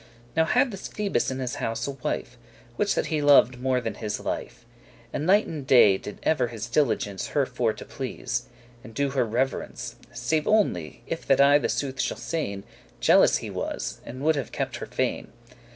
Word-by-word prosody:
Now 160 0 +4
had 250 +7 +2
this 195 - -6
Phoebus 210 -2 -1
in 130 - -3
his 125 -2 -3
house 115 +1 -2
a 140 - -2
wife; 125 -2 -4 0.4
Which 205 +7 +1
that - - 0
he 150 - +1
loved 135 -4 +5
more 130 -1 +2
than 125 - -3
his 105 -2 -4
life. 120 - -5 0.5
And 150 - -2
night 205 +3 +5
and 150 -5 -6
day 105 -7 +6
did 105 - -8
ever 130 -6 +2
his 115 -2 -6
diligence 115 -6 0
Her 140 -2 +1
for 125 -3 0
to - - -10
please, 125 -2 -4 0.4
and 115 -3 -12
do 140 +1 0
her 135 -2 +2
reverence: 120 +4 -2
Save 155 -1 -1
only, 140 - +1
if 165 - -5
that 135 - +4
I 140 +1 +7
the - - -1
sooth 135 -2 -1
shall - - -2
sayn, 100 -12 -3 0.4
Jealous - - +5
he - - -6
was, - - -4
and 130 +3 -8
would 155 0 +3
have 135 - -4
kept - - -3
her - - -6
fain. - - -2
130 Hz, 195 wpm, -26 LUFS, 120-150 Hz, 0.5 s, I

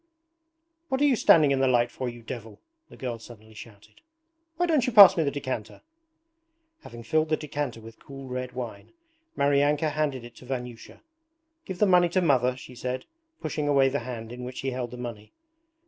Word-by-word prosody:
'What 265 -1 0
are - - +5
you 275 -3 +4
standing 155 -9 +5
in 135 - +1
the 135 - +3
light 120 -1 +2
for, 130 -2 -4
you 120 -1 -11
devil!' 115 -3 -8 0.3
the - - -14
girl 120 -3 -5
suddenly 110 -1 -14
shouted. 105 -1 -14 0.6
'Why 350 - +2
don't 305 -7 +2
you - - 0
pass 200 -4 +10
me 165 - +1
the 145 - +1
decanter!' 130 -6 -5 1.0
Having 120 0 -11
filled 155 +6 +1
the 155 - +2
decanter 145 -5 -4
with 115 0 -13
cool 135 -1 -10
red 125 0 -5
wine, 120 - -7 0.4
Maryanka 145 +2 +2
handed 145 -5 -2
it 120 - -13
to - - -14
Vanyusha. 125 -3 -7 0.6
'Give 185 - -6
the 210 - +4
money 180 -2 +4
to 185 - +1
Mother,' 130 -6 +2
she 130 - -11
said, 125 +1 -4 0.4
pushing 150 -1 -3
away 135 -2 +4
the 140 +2 -1
hand 115 -2 -7
in 125 +1 -8
which 125 +1 -6
he 135 - -2
held 125 -1 -4
the 125 - -9
money. 115 -4 -8
130 Hz, 195 wpm, -26 LUFS, 120-150 Hz, 1.0 s, pass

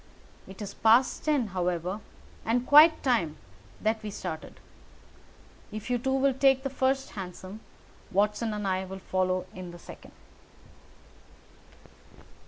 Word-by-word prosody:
It 195 +2 -9
is 200 - -7
past 230 +3 +3
ten, 285 -8 +1
however, 180 +1 -1 0.4
and 240 +2 0
quite 310 +3 +7
time 185 - +1 0.4
that 220 0 0
we 215 - -5
started. 180 -6 -7 1.1
If 215 +3 -6
you 245 - +1
two 265 +3 -1
will 270 0 +3
take 270 0 +3
the 275 - -3
first 270 0 0
hansom, 190 +1 -8 0.5
Watson 210 +3 +1
and 210 -1 -3
I 190 0 0
will 190 0 -7
follow 185 -1 -1
in 185 -1 -8
the 175 - -10
second." - - -13
210 Hz, 130 wpm, -28 LUFS, 185-260 Hz, 1.1 s, quite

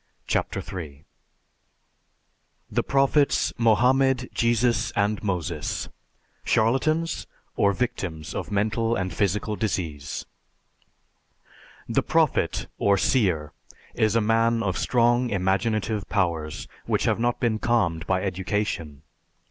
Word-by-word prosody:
CHAPTER - - -1
III 75 -6 -7 1.7
THE - - +1
PROPHETS 140 +1 +2
MOHAMMED, 125 +3 +3
JESUS, 120 0 +2
AND 105 +1 +1
MOSES 90 -6 -3 0.5
CHARLATANS 155 +9 +1 0.3
OR 100 - +3
VICTIMS 95 -8 -3
OF - - -4
MENTAL 110 +3 0
AND 95 -3 -2
PHYSICAL 105 +2 0
DISEASE 80 -8 -3 1.6
_The - - +1
prophet - - +1
or 100 0 +3
seer 90 - +1 0.4
is 110 0 +1
a 115 - +4
man 115 +1 +2
of 95 -3 -1
strong 120 +1 +2
imaginative 100 +2 0
powers, 85 -6 -1 0.2
which - - +1
have - - +1
not 120 +1 0
been 110 -3 0
calmed 95 -10 0
by 95 -1 +1
education. 90 -5 -2
105 Hz, 105 wpm, -25 LUFS, 90-115 Hz, 1.7 s, a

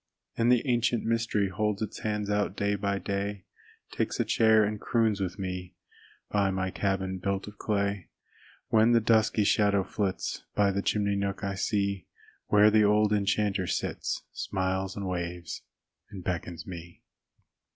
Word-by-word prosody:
And 115 +1 +3
the 125 +2 +3
ancient 120 -1 +1
mystery 115 -3 +1
Holds 105 +2 -1
its 110 - -6
hands 105 -1 -2
out 105 -1 0
day 100 0 +1
by 100 0 -1
day, 100 0 -3 0.5
Takes - - -2
a - - +2
chair 110 -1 +4
and 105 0 -2
croons 110 -4 +1
with 90 -2 -3
me 90 -2 -5 0.6
By 100 -2 +2
my 95 0 -1
cabin 95 -1 -1
built 100 +2 -2
of 105 - -11
clay. 100 -3 -1 0.6
When 110 +2 +5
the 115 - +6
dusky 110 -1 +3
shadow 100 -1 +3
flits, 95 -1 -3
By 100 -1 +3
the 100 +1 -1
chimney 100 -1 +1
nook 100 -1 -2
I 100 0 -1
see 100 0 -1 0.4
Where 105 +1 +6
the 110 0 +5
old 105 0 +4
enchanter 100 -2 +1
sits, - - -2
Smiles 95 0 -2
and 100 -1 -4
waves 85 -2 -4 0.5
and 95 -3 -9
beckons 85 -2 -4
me. 85 -2 -9
100 Hz, 155 wpm, -28 LUFS, 95-105 Hz, 0.6 s, the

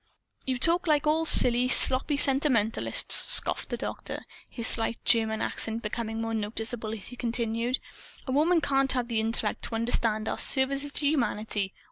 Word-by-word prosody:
"You 260 -1 -1
talk 335 +7 +1
like 300 -2 +1
all 320 +2 0
silly, 245 -2 +6
sloppy 265 +3 +3
sentimentalists!" 265 -6 +2
scoffed - - +4
the - - -4
Doctor, - - -7 0.2
his 235 -3 -3
slight 230 0 0
German 220 -2 +1
accent 225 +1 -4
becoming 225 +1 -5
more 225 0 -4
noticeable 220 +1 -5
as 215 -3 -9
he 245 - -11
continued: 235 +1 -2 0.5
"A 260 - -5
woman 320 +5 +2
can't 270 -2 0
have 250 -2 -3
the 230 -2 -1
intellect 225 +1 -2
to 225 - -6
understand 225 -2 -1
our - - -3
services 275 +2 0
to 290 - -2
humanity. 215 -8 -2
240 Hz, 160 wpm, -26 LUFS, 225-275 Hz, 0.5 s, silly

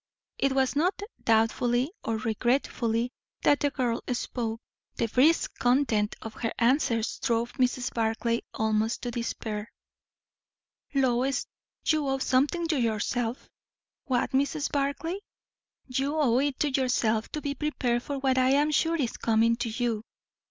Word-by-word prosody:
It 275 -1 +2
was 265 0 +1
not 360 +6 +1 0.2
doubtfully 240 +4 +2
or 225 -1 -1
regretfully 235 +1 0 0.3
that 290 - +4
the 290 - +2
girl 245 -4 -1
spoke; 230 -2 -3 0.4
the - - 0
brisk 280 +9 +3
content 245 -5 +2
of 220 - -6
her 225 0 -3
answers 235 -2 +1
drove 235 -1 0
Mrs. 250 0 +1
Barclay 230 +1 0
almost 220 +1 0
to 245 - -2
despair. 220 -2 -4 1.2
"Lois, 260 0 +2 0.4
you 310 -3 +2
owe 270 0 +1
something 285 +6 +1
to 305 -5 +2
yourself." 230 +2 -1 0.6
"What, 255 -1 0
Mrs. 285 +2 0
Barclay?" 285 +6 -1 0.7
"You 270 +3 -1
owe 255 -5 +3
it 280 -1 -1
to 295 - +2
yourself 240 -4 +1
to 305 - -1
be 285 -1 -2
prepared 260 -5 -1
for 280 +2 -4
what 265 -1 +2
I 255 +1 +4
am 295 +2 +3
sure 325 +2 +2
is 270 -8 -1
coming 230 +1 +3
to 235 - -2
you. 225 -1 -1
250 Hz, 140 wpm, -28 LUFS, 230-280 Hz, 1.2 s, that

